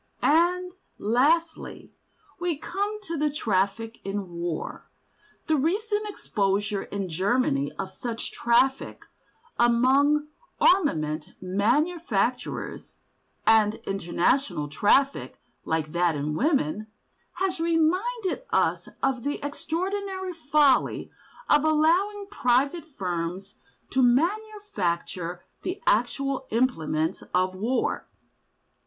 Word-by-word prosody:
And, 355 +4 +3 0.3
lastly, 300 +10 0 0.5
we 350 -3 -1
come 405 +7 -3
to 335 -4 -4
the 300 0 +2
traffic 225 -3 -1
in 195 -1 -4
war. 170 -1 -5 0.6
The 315 - +2
recent 415 +8 0
exposure 205 - -1
in 200 -1 -4
Germany 180 - +1
of 190 -1 -4
such 230 +3 -5
traffic 260 +3 +1 0.5
among 270 +5 +4 0.3
armament 155 - +2
manufacturers—an 220 - 0
international 175 - 0
traffic 270 - +2 0.3
like 160 -1 -1
that 170 -1 +2
in 145 +1 -2
women—has 235 - -2
reminded 360 +7 +1
us - - +1
of 265 -2 +1
the 285 +4 -2
extraordinary 375 +5 -3
folly 300 -4 +2 0.4
of 295 0 +4
allowing 340 +7 +2
private 275 +4 +1
firms 180 +1 -3 0.4
to 265 - +2
manufacture 245 - 0 0.2
the 365 +2 -4
actual 265 +4 +1
implements 165 -9 0
of 185 +1 +2
war. 225 +7 -1
260 Hz, 90 wpm, -26 LUFS, -, 0.6 s, among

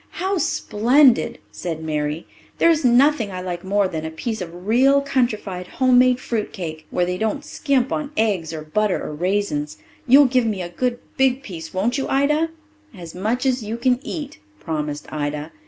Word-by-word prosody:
"How 380 +1 -1
splendid!" 250 0 +3
said 160 -2 -5
Mary. 150 0 -2 0.3
"There's 330 -2 +3
nothing 250 -2 +4
I 185 - -5
like 175 -1 -5
more 200 +1 +1
than 160 -3 -5
a 160 - -3
slice 225 -4 -3
of 175 +1 -8
real 265 +6 +4
countrified 215 -9 -1
home 255 -1 +5
made 250 0 +4
fruit 225 -4 -3
cake, 160 -5 -7
where 180 - 0
they 180 +1 -3
don't 250 +7 -2
scrimp 275 -4 0
on 300 -2 -2
eggs 195 -8 0
or 155 -1 -6
butter 205 +6 0
or - - -5
raisins. 175 -3 -1 0.3
You'll 275 +3 +8
give 255 -2 +2
me 200 -4 -2
a 175 - -6
good 245 +7 -1 0.2
big 265 0 +2
piece, 165 -7 -8
won't 230 +8 0
you, - - -2
Ida?" 300 +4 +2 0.5
"As 170 -2 -9
much 220 +8 -1
as 255 -1 +1
you 220 +2 -4
can 250 +1 +2
eat," 295 - -6 0.2
promised 150 +3 -4
Ida. 150 +1 -3
215 Hz, 180 wpm, -21 LUFS, 175-260 Hz, 0.5 s, You'll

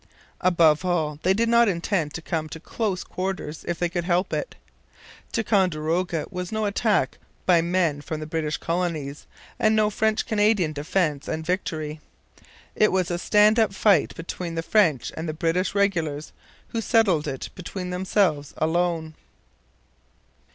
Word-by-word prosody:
Above 165 -3 +4
all, 160 -5 -1
they 185 - +2
did 225 +4 +2
not 235 0 +5
intend 170 -4 0
to 160 - -7
come 155 -2 -2
to 160 - -8
close 195 +1 -2
quarters 185 -5 -4
if 175 - -1
they 175 - +1
could 175 0 -3
help 180 +2 0
it. - - -3 0.8
Ticonderoga 175 -6 0
was 180 -1 -5
no 220 -1 -1
attack 205 0 +1 0.3
by 175 -3 +5
men 170 -4 0
from 155 +1 -5
the 155 - -5
British 155 -1 -2
colonies 165 -5 -3 0.3
and 215 0 +3
no 215 -1 +3
French 220 +2 +1
Canadian 205 -6 +2
defence 150 -1 -1
and 160 0 -3
victory. 160 -4 -2 0.8
It 215 - +4
was 185 -2 0
a 175 - -1
stand 210 +4 +4
up 210 -4 +2
fight 195 -5 +3
between 170 0 -5
the 165 - -2
French 165 - +2
and 160 0 -4
the - - -2
British 170 +5 0
regulars, 165 -7 0 0.4
who 230 - -2
settled 205 -10 +2
it 135 - -4
between 180 0 -6
themselves 180 -5 0
alone. 160 0 0
175 Hz, 150 wpm, -24 LUFS, 160-200 Hz, 0.8 s, not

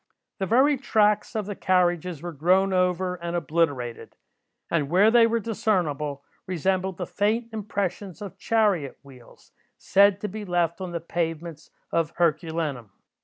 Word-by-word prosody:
The 190 - -1
very 270 +6 +4
tracks 210 -4 +1
of 215 -2 -1
the 205 - -4
carriages 175 -4 0
were 175 - -4
grown 185 +6 +2
over, 180 0 +1
and 170 0 -4
obliterated; 150 -8 -1 0.6
and 150 -4 0
where 195 +6 +5
they 235 -1 +6
were 230 0 0
discernible, 175 -11 -1 0.2
resembled 185 +1 -1
the - - -3
faint 225 +3 -1
impressions 200 -4 -4
of 195 -2 -9
chariot 200 - +1
wheels, 130 -4 -17 0.3
said 200 0 +4
to 210 - -2
be 210 +2 -6
left 175 -2 -1
on 185 -2 -4
the 170 -1 -4
pavements 165 -1 -4 0.2
of 165 -1 0
Herculaneum. 160 - -1
180 Hz, 145 wpm, -25 LUFS, 165-205 Hz, 0.6 s, they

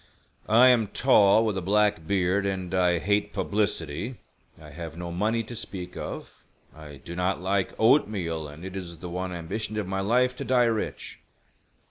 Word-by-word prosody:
"I 120 +4 +7
am 115 -4 +4
tall, 110 -2 +4
with 105 -3 0
a - - -6
black 105 -2 +1
beard, 95 +1 +1
and 95 -2 -3
I 90 -2 +3
hate 105 +3 0
publicity. 100 - -2 0.4
I 75 -1 -12
have 80 +1 -8
no 85 0 -5
money 110 +6 0
to 120 +2 -8
speak 95 -5 -7
of; - - -7 0.3
I 75 -2 -11
do 85 - -7
not 90 +1 0
like 95 +1 -1
oatmeal, 95 - +2
and 75 +4 -10
it 95 0 -7
is 85 -3 -6
the 90 +2 -8
one 90 +1 -3
ambition 100 +6 -4
of 105 - -1
my 95 +1 -3
life 125 +5 +2
to - - -4
die 125 -1 +3
rich. 115 -2 -3
95 Hz, 175 wpm, -26 LUFS, 85-110 Hz, 0.4 s, I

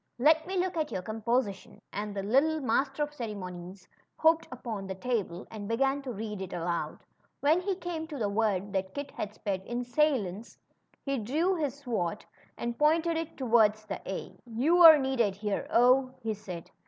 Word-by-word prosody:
Let 315 +6 +4
me 380 0 -2
look 365 -1 0
at 305 -2 -1
your 185 - -3
composition," 220 -2 -2
and 205 0 -4
the 195 - -2
lit 250 +8 +4
tle 315 0 0
Master 270 +4 +1
of 295 0 -5
Ceremonies 185 -6 -7 0.3
hopped 320 +1 +3
upon 225 -6 -5
the 190 - -4
table 205 -5 -2
and 210 -2 -6
began 270 +5 +1
to 265 -2 -5
read 210 -2 -5
it 190 - -6
aloud. 170 0 -3 0.4
When 310 +5 +3
he 385 +1 -1
came 345 -3 -5
to 300 -3 -6
the 220 -5 0
word 200 -2 0
that 190 0 -2
Kit 285 0 -5
had 210 0 -5
spelled 195 -3 -3
insolence^ 240 - -1 0.5
he 275 -2 -1
drew 305 - +1
his 295 -6 -1
sword 230 -12 -3 0.3
and 235 0 -4
pointed 325 +2 +3
it 325 -1 -4
toward 225 -5 +4
the 215 -3 -7
a. 190 - -6
You're 315 +8 +7
needed 260 -7 +1
here, 205 0 -2
0," 255 +2 +4
he 220 -1 -1
said. 185 -5 -8
235 Hz, 180 wpm, -29 LUFS, 205-295 Hz, 0.5 s, You're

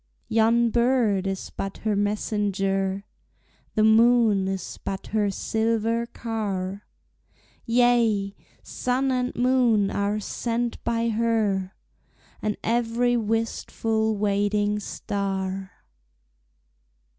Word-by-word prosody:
Yon 230 +1 +3
bird 235 -6 +2
is 195 -1 -4
but 195 0 -5
her 215 -1 +2
messenger, 200 -1 -1 0.7
The 215 - +3
moon 220 -3 +5
is 190 -2 -4
but 195 -1 -4
her 210 -2 +2
silver 225 +3 0
car; 205 -5 -4 0.8
Yea! 230 -4 +3 0.3
sun 260 +2 -1
and 250 0 -1
moon 240 -5 +3
are 205 +1 0
sent 235 +2 -3
by 230 0 0
her, 215 -4 0 0.7
And 210 -1 -1
every 240 +1 +1
wistful 220 -1 -1
waiting 205 0 +1
star. 195 -2 -3
220 Hz, 90 wpm, -25 LUFS, 200-230 Hz, 0.8 s, moon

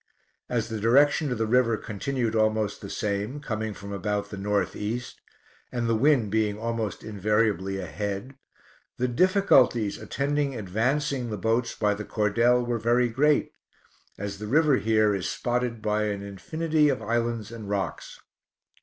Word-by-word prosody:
As 115 -2 -1
the 110 -1 -3
direction 140 +6 +4
of 125 - -1
the 110 - 0
river 115 -1 +3
continued 115 +3 -2
almost 110 -1 +1
the 100 - -7
same, 105 +7 -2
coming 110 -6 -3
from 100 +1 -8
about 105 +1 -2
the - - -5
north 100 +1 -1
east, 115 +4 -4 0.5
and 120 -1 -1
the 115 - +2
wind 120 -3 +3
being 105 -1 +1
almost 115 -2 -3
invariably 105 -2 0
ahead, 100 +6 -4 0.6
the 125 - +1
difficulties 125 - +3
attending 140 -1 -1
advancing 125 +6 -1
the 105 - -3
boats 115 +4 0
by 105 -1 +1
the 105 +1 -5
cordel 115 +4 +2
were 120 -1 -1
very 120 +2 +2
great, 145 +5 +2 0.7
as 100 0 -5
the 105 - -5
river 150 +2 +4
here 110 -1 +2
is 95 -3 -2
spotted 120 -2 -2
by 105 0 +1
an 100 -1 -3
infinity 150 - 0
of 135 - -1
islands 115 -2 -1
and 110 -3 -8
rocks. 100 -3 -3
110 Hz, 155 wpm, -26 LUFS, 105-125 Hz, 0.7 s, direction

